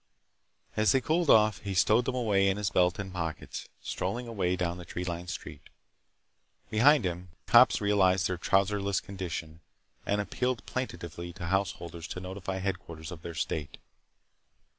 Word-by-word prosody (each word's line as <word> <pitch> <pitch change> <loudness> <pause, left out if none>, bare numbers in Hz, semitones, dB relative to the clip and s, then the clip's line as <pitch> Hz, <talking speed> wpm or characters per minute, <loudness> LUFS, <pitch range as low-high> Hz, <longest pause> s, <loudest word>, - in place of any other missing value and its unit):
As 110 -2 +4
they 135 - +4
cooled 160 +4 +1
off 110 -4 +5
he 100 0 -4
stowed 110 +7 +4
them 130 - -1
away 100 -5 +3
in 95 - 0
his 105 -2 -1
belt 90 -1 +3
and 95 -2 -5
pockets, 80 -3 -5
strolling 110 +7 -3
away 95 -6 0
down 90 -1 -2
the - - -7
tree 90 +1 -5
lined 85 0 -4
street. - - -7 1.0
Behind 125 +3 +5
him, 90 0 -3 0.2
cops 120 +2 +6
realized 95 -4 +3
their 90 -2 -3
trouserless 100 +1 +2
condition 85 -5 -6 0.4
and 100 - 0
appealed 125 +4 -2
plaintively 85 -8 -5
to 90 -1 -7
householders 85 -3 -2
to - - -5
notify 95 +1 -5
headquarters 90 -4 -4
of 85 -2 -8
their 85 0 -7
state. 80 -3 -3
95 Hz, 155 wpm, -29 LUFS, 90-105 Hz, 1.0 s, cops